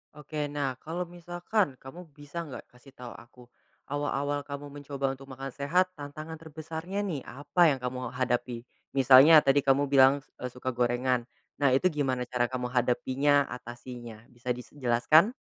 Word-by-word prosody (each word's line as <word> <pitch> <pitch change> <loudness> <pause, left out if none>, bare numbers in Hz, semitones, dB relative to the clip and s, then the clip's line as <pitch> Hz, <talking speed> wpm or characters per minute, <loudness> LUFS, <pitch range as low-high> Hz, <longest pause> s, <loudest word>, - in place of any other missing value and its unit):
Oke 150 0 -4
nah, 140 -3 -3
kalau 170 +3 -4
misalkan 175 0 -2
kamu 170 +7 -11
bisa 150 +3 -7
nggak 135 - -8
kasih 125 +2 -19
tahu 125 -1 -9
aku 125 +1 -14 0.4
awal-awal 145 0 -1
kamu 140 0 -7
mencoba 140 -1 -2
untuk 135 +1 -14
makan 135 +1 -6
sehat 175 +8 +1
tantangan 155 +2 -8
terbesarnya 160 +4 -6
nih 175 -8 -2
apa 145 +7 -2
yang - - -10
kamu 125 0 -4
hadapi? 120 -2 -1 0.3
Misalnya 135 +4 +8
tadi 140 0 +4
kamu 135 0 +3
bilang 135 0 +6
s - - -29
eee, 125 - -4
suka 125 +1 -4
gorengan. 120 0 0 0.3
Nah, 140 -3 +4
itu 185 +7 +3
gimana 135 -4 -1
cara 125 -1 +1
kamu 125 0 -3
hadapinya 130 +3 +2
atasinya 120 -2 -9
bisa 120 +1 -9
dis 125 - -10
jelaskan? 135 - +4
135 Hz, 160 wpm, -28 LUFS, 125-150 Hz, 0.4 s, Misalnya